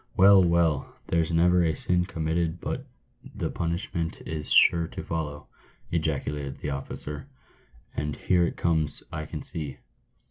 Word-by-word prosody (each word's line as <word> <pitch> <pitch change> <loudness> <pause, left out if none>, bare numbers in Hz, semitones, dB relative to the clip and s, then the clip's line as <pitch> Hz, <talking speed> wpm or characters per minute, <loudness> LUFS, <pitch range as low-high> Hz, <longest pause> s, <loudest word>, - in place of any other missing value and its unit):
" - - -25
Well, 95 0 +8
well! 85 -5 +2
there's 85 -2 +1
never 90 +2 +4
a 80 -2 +1
"sin 90 +2 +1
committed 80 -1 -1
but - - -4 0.5
the - - -2
punishment 85 -1 -2
is 75 -1 -4
sure 85 -1 +5
to - - -7
follow," 75 -3 -4 0.5
ejaculated 75 -3 -1
the 75 - -4
officer; 75 - -6 0.3
" - - -29
and 75 0 -2
here 90 -2 +2
it - - -5
comes, 80 -3 +1
I 75 0 -4
can 75 -3 -6
see." 75 -5 -5
80 Hz, 150 wpm, -27 LUFS, 75-85 Hz, 0.5 s, Well